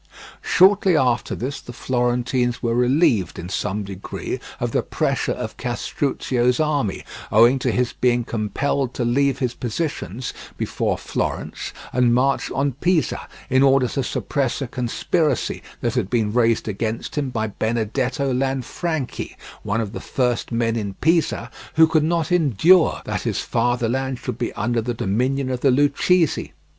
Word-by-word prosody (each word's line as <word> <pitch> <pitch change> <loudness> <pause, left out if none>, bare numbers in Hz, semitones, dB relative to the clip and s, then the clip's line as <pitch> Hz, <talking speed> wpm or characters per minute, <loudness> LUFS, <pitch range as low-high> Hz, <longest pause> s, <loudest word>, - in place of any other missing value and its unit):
Shortly 190 -2 +5
after 125 -3 +1
this 135 +3 -4
the 120 - -10
Florentines 125 0 0
were 115 -1 +1
relieved 125 - +2
in 85 - -6
some 105 +1 -2
degree 95 0 -5 0.2
of - - -1
the - - +2
pressure - - -1
of - - -6
Castruccio's 125 0 0
army, 145 -9 0 0.3
owing 120 +5 +6
to - - 0
his 125 -1 0
being 120 -1 +2
compelled 125 +4 -1
to 120 - -1
leave 135 +2 +2
his 125 -3 -1
positions 125 - -4 0.2
before - - -1
Florence - - -3 0.2
and 120 -1 +3
march 135 +2 +1
on 140 +1 0
Pisa, 165 +5 0 0.2
in 130 -1 +3
order 135 -2 +5
to 135 - -1
suppress 135 0 -1
a 135 - -2
conspiracy 130 +4 -1 0.2
that 120 - 0
had 120 -7 -1
been 110 -4 0
raised 115 -2 +2
against 110 +2 -3
him 145 -3 -1
by 115 -3 -1
Benedetto 120 +5 -1
Lanfranchi, 135 +3 -2 0.3
one 110 +2 -1
of 105 -1 -5
the - - -4
first 125 -2 -1
men 115 -1 +1
in 100 -4 -3
Pisa, 165 - +1 0.2
who 160 0 +8
could 160 -1 +2
not 165 +1 0
endure 165 - +4
that - - -2
his - - -1
fatherland 120 +2 0
should 120 -1 -5
be 120 - -1
under 115 +2 0
the 120 +1 -3
dominion 130 +6 0
of 125 - -2
the 140 - +4
Lucchese. 145 +5 +2
125 Hz, 150 wpm, -22 LUFS, 115-140 Hz, 0.3 s, who